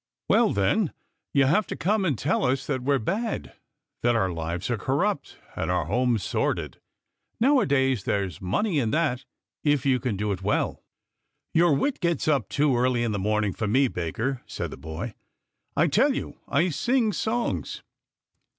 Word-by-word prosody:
" - - -66
Well, - - +4
then, 150 - +1 0.4
you 140 -1 +4
have 195 +10 +2
come 205 +6 +2
to 155 -7 +1
tell 145 +7 0
us 135 +1 +1
that 135 -3 -2
we 140 +3 +2
are - - +3
bad, 205 - -3 0.5
that 120 0 +3
our 95 -5 +1
lives 85 +1 -3
are - - +1
corrupt - - -1 0.2
and - - -2
our 90 -3 +1
homes 120 +3 +1
sordid. - - -2 0.6
Nowadays 140 - +3
there's 95 -7 -2
money 150 - 0
in 115 -5 0
that 135 -3 0 0.4
if 145 -3 +2
you 130 -2 +3
can 120 -6 -2
do 105 +1 -1
it 95 -1 -3
well." 105 +2 -1 0.3
" - - -53
Your 165 -2 +4
wit 275 - 0
gets 170 -5 0
up 140 -10 +2
too 145 -2 +2
early 120 0 +2
in 115 - 0
the 105 - -2
morning 105 0 0
for 110 - -2
me, 130 +6 +3
baker," 115 +8 -3
said - - -4
the - - -6
boy. 80 - -6 0.3
" - - -52
I - - +5
tell - - +3
you - - -5
I 160 +6 +2
sing 225 - +1
songs." 235 +4 -2
130 Hz, 180 wpm, -26 LUFS, 105-155 Hz, 0.6 s, I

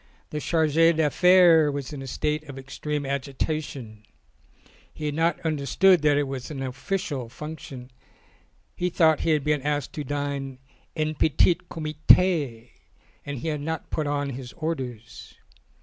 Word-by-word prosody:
The 150 - -3
Charge 160 -1 +1
d' 165 0 +4
Affaires 165 0 +5
was 140 0 -5
in 140 - -6
a 135 - -7
state 150 +3 -2
of 135 - -8
extreme 145 +2 -4
agita 140 +3 -2
tion; 110 -7 -9 0.9
he 155 - -7
had 150 - -1
not 165 +1 +1
understood 160 +4 +3
that 150 -1 +3
it 145 - +2
was 135 -2 -5
an 135 -3 -5
official 135 - -3
function, 135 -2 -9 0.8
he 180 - -1
thought 160 -3 +3
he - - -1
had 155 -3 +2
been 150 -1 +1
asked 145 -1 -2
to 150 - -4
dine 140 -1 -3 0.4
en 155 -1 -1
petit 160 +3 +3
comitS, 155 -4 +2 0.6
and 145 -1 -4
he 145 +7 -3
had 150 -2 -3
not 160 +2 -4
put 155 -2 -1
on 145 -1 -1
his 125 -1 -8
orders. 130 -9 -6
150 Hz, 155 wpm, -25 LUFS, 135-160 Hz, 0.9 s, Affaires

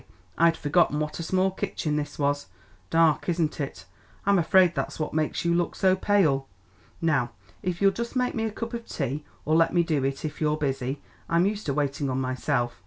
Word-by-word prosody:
I'd 165 0 +4
forgotten 150 0 +2
what 150 +1 -3
a - - -2
small 185 +3 +1
kitchen 155 -4 -2
this 150 0 -3
was. 145 0 0 0.4
Dark, 165 0 +3
isn't 165 -3 0
it? 140 -9 -5 0.4
I'm 200 -1 +4
afraid 175 +1 +5
that's - - -3
what 155 - -2
makes 155 +2 -1
you 170 - +3
look 175 0 0
so 185 -1 +3
pale. 175 -9 +2 0.5
Now 140 -8 +1 0.3
if 180 +1 -2
you'll 195 - +6
just 235 +5 -5
make 250 -1 +1
me 225 -1 -1
a 220 - -2
cup 230 +2 -5
of 235 -1 -5
tea 140 +1 -3 0.2
or 155 - +2
let 165 +2 +3
me 170 - +5
do 155 -5 0
it 135 +3 -2
if 155 - -5
you're 150 0 +2
busy; 135 -2 -2 0.3
I'm 170 +2 +3
used 210 -1 -2
to 140 - +1
waiting 140 -1 -1
on 130 0 -1
myself. 130 -1 -1
160 Hz, 205 wpm, -26 LUFS, 145-185 Hz, 0.5 s, you'll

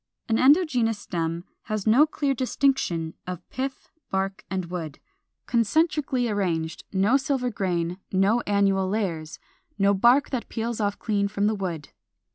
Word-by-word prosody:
An 225 0 +1
endogenous 260 - +4
stem 170 -3 -3 0.2
has 215 -3 -3
no 250 +8 +6
clear 285 -2 0
distinction 255 - 0
of 180 -2 -6
pith, 265 +1 -5 0.2
bark, 195 +1 -2
and 185 -1 -2
wood, 165 -4 -5 0.5
concentrically 265 - +1
arranged, 175 -6 -2
no 200 +7 +3
silver 265 -2 -1
grain, 180 -3 -2
no 195 +5 +3
annual 195 -2 +2
layers, 170 -7 -2 0.4
no 200 0 +4
bark 240 +8 +4
that 255 -4 -3
peels 230 0 -3
off 205 -1 0
clean 205 -2 0
from 200 0 -1
the 215 - +2
wood. 175 -7 -4
205 Hz, 140 wpm, -25 LUFS, 185-245 Hz, 0.5 s, no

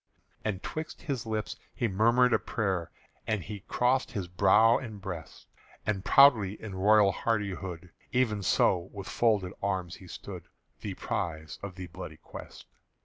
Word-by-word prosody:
And 105 -3 -2
'twixt 155 0 -5
his 135 -8 -3
lips 110 -1 -2 0.2
he 120 - +1
murmured 115 +5 +4
a - - +4
prayer, 95 -7 -1 0.4
And 110 -4 0
he 105 -1 -6
crossed 125 +6 +1
his 100 -5 -3
brow 105 +6 +5
and 110 -5 -7
breast; 90 -6 -7 0.4
And 100 -3 -1
proudly 110 -9 +6
in 110 -3 -7
royal 100 +1 +5
hardihood 95 -6 -2 0.2
Even 120 -5 +1
so 90 -1 +2
with 100 -2 -7
folded 105 -6 +1
arms 95 -3 -2
he 95 - -13
stood - - -8 0.3
The - - -5
prize 80 -2 -4
of 100 -2 -6
the 95 -1 -6
bloody 85 - -8
quest. - - -11
100 Hz, 150 wpm, -29 LUFS, 95-115 Hz, 0.4 s, proudly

